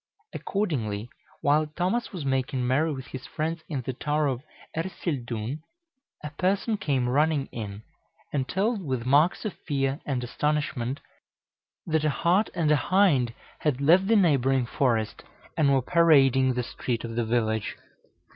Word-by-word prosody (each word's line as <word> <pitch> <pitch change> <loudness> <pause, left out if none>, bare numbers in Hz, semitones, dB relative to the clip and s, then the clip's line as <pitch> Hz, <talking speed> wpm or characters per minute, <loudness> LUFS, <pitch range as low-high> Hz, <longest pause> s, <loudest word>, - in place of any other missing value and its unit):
Accordingly, 120 - -2 0.3
while 150 +2 +3
Thomas 180 +10 -1
was 175 -8 -5
making 130 -1 0
merry 145 +6 +2
with 130 -3 -6
his 130 0 -8
friends 160 +1 -3
in 140 -5 -3
the 130 - -3
Tower 150 +4 0
of 130 -3 -1 0.3
Ercildoune, 140 - -3 0.6
a 150 - -5
person 195 +7 0
came 135 -8 0
running 145 +2 +2
in, 105 -2 -6 0.5
and 135 -3 0
told, 205 +2 0
with 130 -6 -2
marks 150 - +3
of 210 - -2
fear 135 -1 0
and 130 -4 -2
astonishment, 140 -1 -1 0.8
that 160 -2 +1
a 155 - +3
hart 180 +8 +2
and 160 -3 +2
a - - +6
hind 145 - +2 0.2
had 145 -4 0
left 175 +7 +5
the 225 - +4
neighboring 135 - +3
forest, 120 -5 0 0.3
and 145 -3 +3
were 135 -2 +3
parading 135 -6 +4
the 125 - 0
street 120 0 -3
of 115 -1 -5
the 120 - +1
village. 110 -2 0
140 Hz, 150 wpm, -26 LUFS, 125-160 Hz, 0.8 s, a